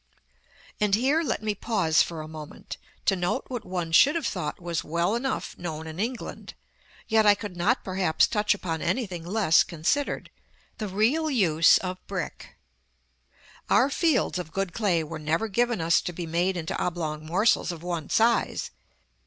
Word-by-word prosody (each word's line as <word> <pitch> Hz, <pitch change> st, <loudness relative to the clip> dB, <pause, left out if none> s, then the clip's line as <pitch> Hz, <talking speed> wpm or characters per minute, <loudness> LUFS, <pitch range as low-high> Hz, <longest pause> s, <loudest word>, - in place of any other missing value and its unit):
§ -, -, -43 dB, 0.8 s
XXXVIII. 210 Hz, -, +3 dB
And 195 Hz, -, +3 dB
here 270 Hz, +8 st, +2 dB
let 300 Hz, -, -2 dB
me 215 Hz, -1 st, 0 dB
pause 195 Hz, -7 st, +2 dB
for 165 Hz, -2 st, -2 dB
a -, -, -9 dB
moment, 155 Hz, -1 st, -9 dB, 0.3 s
to 195 Hz, -, +3 dB
note 180 Hz, +8 st, -1 dB
what 245 Hz, -3 st, -4 dB
one 175 Hz, -4 st, -4 dB
should 280 Hz, -, +6 dB
have 330 Hz, -, -1 dB
thought 175 Hz, -6 st, -3 dB
was 170 Hz, -2 st, -3 dB
well 170 Hz, +5 st, 0 dB
enough 260 Hz, +3 st, -2 dB
known 160 Hz, -2 st, -5 dB
in 160 Hz, +2 st, -8 dB
England, 235 Hz, +4 st, -5 dB, 0.5 s
yet 220 Hz, -1 st, +3 dB
I 205 Hz, -, +7 dB
could 205 Hz, -3 st, -7 dB
not 205 Hz, +9 st, +1 dB
perhaps 185 Hz, -4 st, +2 dB
touch 210 Hz, -1 st, +1 dB
upon 165 Hz, -5 st, -4 dB
anything 190 Hz, -10 st, -2 dB
less 185 Hz, -2 st, +3 dB
considered, 175 Hz, -, -2 dB, 0.5 s
the 215 Hz, -, -2 dB
real 235 Hz, +12 st, +1 dB
use 170 Hz, -, +5 dB
of 185 Hz, 0 st, -4 dB
brick. -, -, -6 dB, 1.1 s
Our 270 Hz, +3 st, +4 dB
fields 280 Hz, -, +1 dB
of 160 Hz, -3 st, -6 dB
good 195 Hz, -2 st, -2 dB
clay 185 Hz, -7 st, +1 dB
were 155 Hz, 0 st, -7 dB
never 160 Hz, +8 st, 0 dB
given 240 Hz, +1 st, 0 dB
us 165 Hz, +1 st, +3 dB
to -, -, -4 dB
be 175 Hz, 0 st, -5 dB
made 175 Hz, +3 st, 0 dB
into 160 Hz, -1 st, -3 dB
oblong 155 Hz, -3 st, -3 dB
morsels 185 Hz, +5 st, +2 dB
of 170 Hz, -1 st, -9 dB
one 170 Hz, -4 st, -4 dB
size. 230 Hz, +1 st, +1 dB
185 Hz, 175 wpm, -26 LUFS, 165-220 Hz, 1.1 s, I